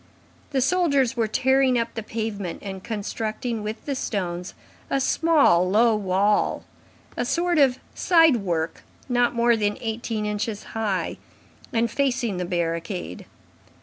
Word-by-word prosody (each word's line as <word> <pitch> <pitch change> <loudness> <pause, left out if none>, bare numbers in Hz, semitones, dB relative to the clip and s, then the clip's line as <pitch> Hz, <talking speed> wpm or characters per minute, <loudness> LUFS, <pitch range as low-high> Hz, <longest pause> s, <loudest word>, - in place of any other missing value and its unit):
The 270 -2 0
soldiers 280 -5 +2
were 230 -2 +1
tearing 265 +2 +3
up 230 0 -1
the 225 - -4
pavement 215 -5 -4
and 190 -2 -6
constructing 220 +2 -3
with 215 +2 -6
the 285 - -1
stones 180 -8 -3 0.3
a 275 - +1
small, 275 - +3
low 225 +3 +4
wall, 200 +1 +1 0.5
a - - -1
sort 345 -1 +1
of 265 -3 +4 0.2
side 325 -7 +5
work 170 -6 -2 0.3
not 245 -2 +2
more 235 0 +4
than 210 -2 0
eighteen 225 -1 -3
inches 210 0 -3
high, 210 -4 -1 0.5
and 230 -1 +1
facing 245 -7 0
the 180 - -2
barricade. 165 - -3
225 Hz, 135 wpm, -24 LUFS, 200-255 Hz, 0.5 s, side